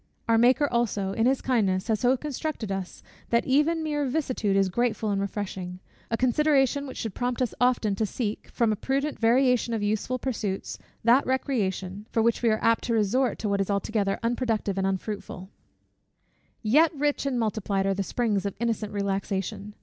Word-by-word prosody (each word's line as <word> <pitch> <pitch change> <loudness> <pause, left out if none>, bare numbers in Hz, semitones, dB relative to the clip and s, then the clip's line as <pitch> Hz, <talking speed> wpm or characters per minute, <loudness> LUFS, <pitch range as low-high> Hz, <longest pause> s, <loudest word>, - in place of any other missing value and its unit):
Our 225 -1 +4
Maker 255 +5 +4
also, 220 -6 0
in 225 +3 +2
his 265 0 +1
kindness, 200 -7 +1
has 220 -2 +1
so 255 +1 +3
constructed 285 -5 -4
us, 195 -2 -5 0.3
that 235 0 +2
even 300 +5 +2
mere 295 -2 -1
vicissitude 255 -8 0
is 195 -1 +3
grateful 225 +1 0
and 195 -1 0
refreshing 190 -2 -4 0.3
a 230 - 0
consideration 280 +2 +2
which 260 - -8
should 220 -4 -4
prompt 245 +3 -2
us 250 -3 0
often 245 -4 +2
to 220 - +1
seek, 215 -1 -4
from 230 -2 +1
a - - +1
prudent 275 +7 -2
variation 245 0 +3
of 215 - -2
useful 215 +5 -1
pursuits, 220 -7 -3 0.2
that 240 +4 +5
recreation, 205 -7 -2
for 225 - +1
which 235 0 +2
we 235 - +3
are 215 0 0
apt 230 0 +3
to 235 - 0
resort 235 +5 +1
to 210 - -3
what 200 0 +1
is 195 - -2
altogether, 200 0 0
unproductive 230 -4 0
and 190 - +1
unfruitful. 195 -1 -4 1.1
Yet 295 +9 +5
rich 290 0 0
and 255 -3 0
multiplied 205 -3 -1
are 195 - +2
the 195 - -2
springs 210 0 0
of 200 - -5
innocent 225 -3 -2
relaxation. 200 0 -3
225 Hz, 180 wpm, -26 LUFS, 200-255 Hz, 1.1 s, that